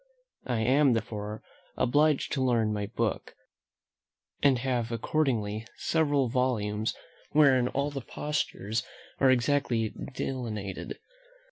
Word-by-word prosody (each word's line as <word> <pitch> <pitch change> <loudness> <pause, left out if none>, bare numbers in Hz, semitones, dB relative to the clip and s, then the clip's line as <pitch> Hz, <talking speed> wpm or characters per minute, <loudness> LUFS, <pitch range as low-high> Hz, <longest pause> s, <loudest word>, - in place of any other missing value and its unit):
I 120 -3 0
am, 135 +3 +4
therefore, 105 -1 -4 0.3
obliged 150 +3 +2
to 135 - 0
learn 115 -4 +2
by 105 -1 -2
book; 115 -1 -2 1.1
and 140 -3 +5
have 120 -2 -1
accordingly 115 -4 -1
several 145 -5 +2
volumes, 115 -4 0 0.4
wherein 135 -4 +5
all 140 +3 -1
the 140 -1 -4
postures 115 -7 -2 0.4
are 135 - +5
exactly 120 -3 +2 0.2
delineated. 110 -8 -4
125 Hz, 105 wpm, -29 LUFS, 110-135 Hz, 1.1 s, and